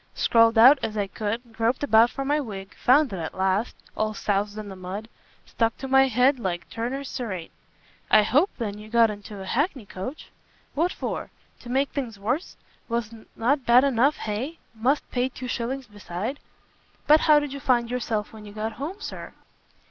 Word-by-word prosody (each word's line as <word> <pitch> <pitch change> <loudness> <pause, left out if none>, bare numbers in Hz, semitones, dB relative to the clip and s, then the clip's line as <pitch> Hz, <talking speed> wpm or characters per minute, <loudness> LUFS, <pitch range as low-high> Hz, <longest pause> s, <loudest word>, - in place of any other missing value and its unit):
Scrawled 230 0 +4
out 260 +5 +8
as 215 -1 -3
I 205 - +1
could, 225 +4 -4
groped 230 +4 0
about 230 -3 +5
for 275 - -5
my 295 +2 +2
wig, 195 -7 -7
found 265 -2 +3
it - - -3
at 160 +3 -5
last, 190 +4 0 0.2
all 215 0 -1
soused 205 +1 -1
in 215 -1 -6
the 195 - -8
mud; 190 +4 -6 0.4
stuck 225 -1 0
to 270 - -6
my 270 0 +5
head 255 +2 +3
like 175 -6 -3
Turner's 255 +5 -3
cerate." 190 -11 -5 0.6
"I 215 - +6
hope, 290 - +3
then, 210 -4 -4
you 215 0 -11
got 230 -1 +4
into 205 0 -9
a 190 - -7
hackney 270 - -1
coach?" 200 +10 -7 0.4
"What 335 +5 +1
for? - - -4 0.3
to 240 - -11
make 270 +3 +1
things 245 -7 -4
worse? 245 - -3 0.3
was 230 -1 -2 0.2
not 260 +3 0
bad 245 +2 +7
enough, 275 +2 +3
hay? 240 +10 -4 0.2
must 250 +6 0
pay 250 +1 0
two 255 0 -8
shillings 255 +3 -3
beside?" 205 +4 -5 0.7
"But 305 +1 +7
how 305 -1 +5
did 290 -2 -5
you 280 - -6
find 240 -3 +1
yourself 230 -4 -2
when 220 -1 -11
you 205 -1 -11
got 215 +1 -3
home, 315 - -6
Sir?" - - -7
235 Hz, 185 wpm, -25 LUFS, 210-270 Hz, 0.7 s, out